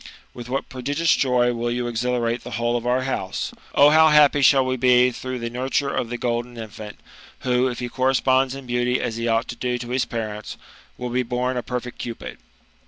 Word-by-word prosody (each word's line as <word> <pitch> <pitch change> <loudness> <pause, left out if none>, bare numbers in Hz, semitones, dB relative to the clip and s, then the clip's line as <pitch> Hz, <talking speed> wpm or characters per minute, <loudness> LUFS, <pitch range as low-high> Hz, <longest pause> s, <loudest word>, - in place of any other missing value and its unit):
With 120 0 -9
what 135 +2 -2
prodigious 145 +6 0
joy 125 -2 +2
will 120 0 -2
you 120 +1 -2
exhilarate 120 0 -1
the 120 - -7
whole 120 0 0
of 120 0 -2
our 125 +1 +1
house 130 -8 -3 0.2
I - - +2
O 145 - +9
how 160 +1 +6
happy 150 -1 +5
shall 135 0 +5
we 130 0 0
be 125 0 +4
through 130 +1 -5
the 115 -1 -5
nurture 130 +3 -1
of 115 - -2
the 120 - -3
golden 120 0 -3
infant, 110 -2 -9 0.4
who^ 125 0 +2
if 120 - -7
he 125 - -3
corresponds 130 +1 +1
in 135 -1 -9
beauty 125 0 0
as 115 - -3
he 115 0 -2
ought 115 +1 +1
to - - -5
do 125 -1 -2
to 120 0 -7
his 125 +1 0
parents, 110 -2 -5 0.4
will 125 -1 -5
be 125 +1 +1
born 125 +1 -2
a 125 - -1
perfect 125 0 -5
Cupid." 115 -1 -7
125 Hz, 215 wpm, -23 LUFS, 120-130 Hz, 0.4 s, O